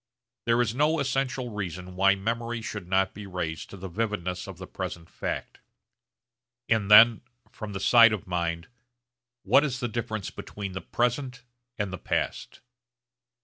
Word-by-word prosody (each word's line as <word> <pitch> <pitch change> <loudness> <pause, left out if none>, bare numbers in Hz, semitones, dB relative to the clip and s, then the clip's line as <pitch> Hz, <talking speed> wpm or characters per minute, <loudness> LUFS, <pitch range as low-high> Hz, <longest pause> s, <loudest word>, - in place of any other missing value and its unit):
There 115 +1 +3
is 115 -1 -2
no 150 +5 +2
essential 135 -2 -1
reason 90 -3 -5
why 100 +1 +4
memory 115 +3 -3
should 105 -4 -6
not 95 +1 +2
be 100 0 -9
raised 85 -3 -4
to 100 - -10
the 95 +1 -6
vividness 95 -2 -3
of - - -8
the - - -8
present 85 -1 -6
fact; - - -5 1.1
and 110 -3 +1
then 110 +2 +8 0.3
from 110 -2 -7
the 95 - -3
side 115 +3 +7
of 105 -3 -3
mind, 85 -2 -2 0.8
What 130 +8 +5
is 130 -4 -2
the 120 - -1
difference 110 -3 -4
between 100 -2 -7
the 95 - -5
present 125 +1 -1 0.3
and 100 -3 -2
the 95 - -5
past? - - -3
105 Hz, 155 wpm, -27 LUFS, 95-120 Hz, 1.1 s, then